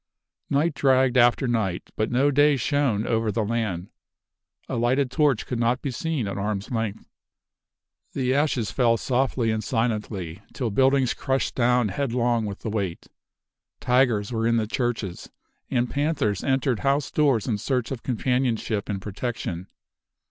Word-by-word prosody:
Night 150 +4 +2
dragged 130 -2 +3
after 120 +2 +4
night, 110 -7 -1
but 110 - 0
no 135 +4 +3
day 145 +1 +4
shone 130 -6 +1
over 115 -1 0
the 110 0 -1
land. 105 -5 -2 0.8
A - - -3
lighted 125 +3 +1
torch 145 -6 +2
could 125 - -3
not 120 +2 +1
be 140 - -2
seen 145 -3 -2
at 100 - -4
arm's 105 +1 -3
length! 115 -4 -3 1.1
The 130 -1 0
ashes 135 -6 +1
fell 115 -3 +3
softly 125 -1 0
and 110 0 -2
silently, 105 -7 -2
till 120 -4 -2
buildings 130 +3 +3
crushed 135 -1 -1
down 125 -2 +2
headlong 120 -1 0
with 100 -1 -7
the 110 - -3
weight. 100 -6 -3 0.7
Tigers 125 -5 +2
were 115 -1 0
in 115 0 +3
the 110 - +1
churches, 115 -5 -3 0.4
and 125 -1 +1
panthers 140 - -1
entered 130 -3 +1
house 140 +1 0
doors 140 -8 +2
in 110 -4 -1
search 125 +1 -1
of 130 -4 -4
companionship 120 -4 -1
and 100 -2 -2
protection. 100 -4 -4
120 Hz, 150 wpm, -25 LUFS, 110-135 Hz, 1.1 s, after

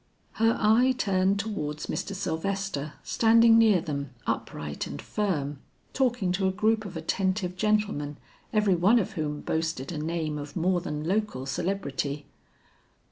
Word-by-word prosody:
Her 225 0 +4
eye 240 +5 +4
turned 195 -3 +2
towards 155 -8 -3
Mr. 200 - -3
Sylvester 185 -3 -2
standing 230 0 +5
near 215 -6 +5
them 140 -3 -4 0.2
upright 75 -1 -3
and 70 - -7
firm, 150 -10 -2 0.3
talking 245 -8 +1
to 190 +1 +1
a - - +2
group 215 +2 +1
of 180 -4 -6
attentive 185 +2 -1
gentlemen 205 -8 0 0.3
every 210 -3 +3
one 185 +7 +4
of 205 - 0
whom 150 -2 -3
boasted 160 -4 -2
a 155 - -4
name 155 -1 -2
of 145 0 -8
more 175 +1 +1
than 150 -3 -4
local 195 -6 -1
celebrity. 145 -3 -2
185 Hz, 140 wpm, -27 LUFS, 150-210 Hz, 0.3 s, standing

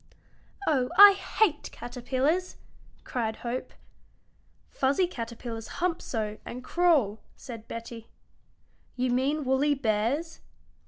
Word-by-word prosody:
"Oh, 260 -5 +2
I 405 0 +11
hate 390 -4 0
caterpillars!" 265 +8 -2 0.5
cried 225 -3 -2
Hope. 245 +2 -3 1.0
"Fuzzy 275 +7 +2
caterpillars 230 -6 -6
hump 345 -1 0
so 215 -3 -4
and 250 +1 -8
crawl," 285 - +2 0.2
said 230 -4 -10
Betty. 230 0 -8 0.9
"You 250 0 0
mean 275 +4 0
woolly 275 +3 +2
bears?" 265 +7 -1
255 Hz, 100 wpm, -28 LUFS, 230-305 Hz, 1.0 s, I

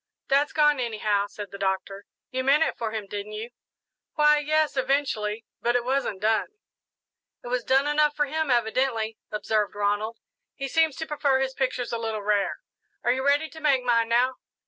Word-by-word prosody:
"That's 280 +2 +3
gone, 295 -2 +3
anyhow," 210 -4 0
said 205 0 -8
the 200 - -9
Doctor. 195 +1 -2 0.2
"You 260 0 -1
meant 285 +4 +4
it - - -1
for 230 - -3
him, 215 -2 -4
didn't 205 +1 -6
you?" 220 +3 -6 0.6
"Why, 300 0 +5
yes, 310 0 +1
eventually; 255 -5 0 0.2
but 240 +1 +1
it 245 -1 +1
wasn't 260 -7 -1
done." 220 0 +2 1.0
"It 240 - -7
was 250 -1 -1
done 270 +2 +3
enough 295 0 +2
for 295 - +2
him, 310 +1 -2
evidently," 230 -2 0
observed 210 -1 -1
Ronald; 205 +2 -1 0.4
"he 275 - -4
seems 320 0 +2
to 320 - -4
prefer 285 -3 +1
his 265 0 -1
pictures 255 -2 -2
a 230 - -1
little 220 -2 -3
rare. 205 -1 0 0.4
Are 240 - +3
you 260 +1 -1
ready 285 +3 +3
to 320 - -11
make 280 -5 +2
mine 230 -2 +2
now?" 250 +2 +2
250 Hz, 185 wpm, -26 LUFS, 215-280 Hz, 1.0 s, Why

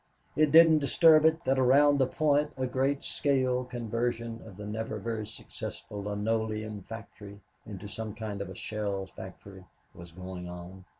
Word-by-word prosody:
It 155 -1 +3
didn't 160 0 +8
disturb 155 +2 +5
it 160 +1 +3
that 135 0 +2
around 140 +3 +5
the 130 - +3
point 150 +1 +1
a 130 - 0
great 135 +2 0
scale 130 -3 +1
conversion 115 -1 -3
of 95 -4 -12
the 105 - -7
never 110 +1 -4
very 110 0 -4
successful 105 -1 -7
linoleum 110 0 -2
factory 100 -1 -10 0.3
into 105 -1 -7
some 110 0 -6
kind 105 -3 -5
of 100 - -5
a 95 - -8
shell 100 -2 -3
factory 95 +1 -11 0.3
was 85 0 -12
going 90 0 -7
on. 90 +2 -10
110 Hz, 160 wpm, -29 LUFS, 100-130 Hz, 0.3 s, didn't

